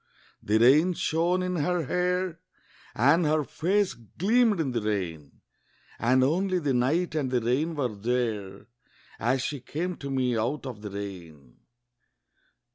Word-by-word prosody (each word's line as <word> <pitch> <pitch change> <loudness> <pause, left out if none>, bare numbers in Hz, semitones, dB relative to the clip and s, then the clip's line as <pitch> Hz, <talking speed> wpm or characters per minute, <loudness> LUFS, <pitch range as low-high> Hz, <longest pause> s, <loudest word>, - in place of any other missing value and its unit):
The 105 +2 +1
rain 145 +10 +5
shone 175 +3 0
in 180 -1 -2
her 170 +2 0
hair, 180 +1 -1 0.6
And 145 +9 +4
her 155 0 +2
face 190 +7 0
gleamed 205 - +1
in 145 -5 0
the 120 -2 -1
rain; 90 -8 -4 0.6
And 130 +2 +3
only 185 +7 +1
the 145 -6 0
night 150 +8 +1
and 145 -4 -1
the 125 -1 +1
rain 135 +8 0
were 130 -6 -1
there 105 -3 -2 0.5
As 130 +3 +1
she 145 +1 -3
came 175 +8 -4
to 140 - -7
me 130 -2 0
out 120 +7 -2
of 120 -6 -7
the 105 - -6
rain. 85 -10 -9
135 Hz, 145 wpm, -27 LUFS, 115-170 Hz, 0.6 s, rain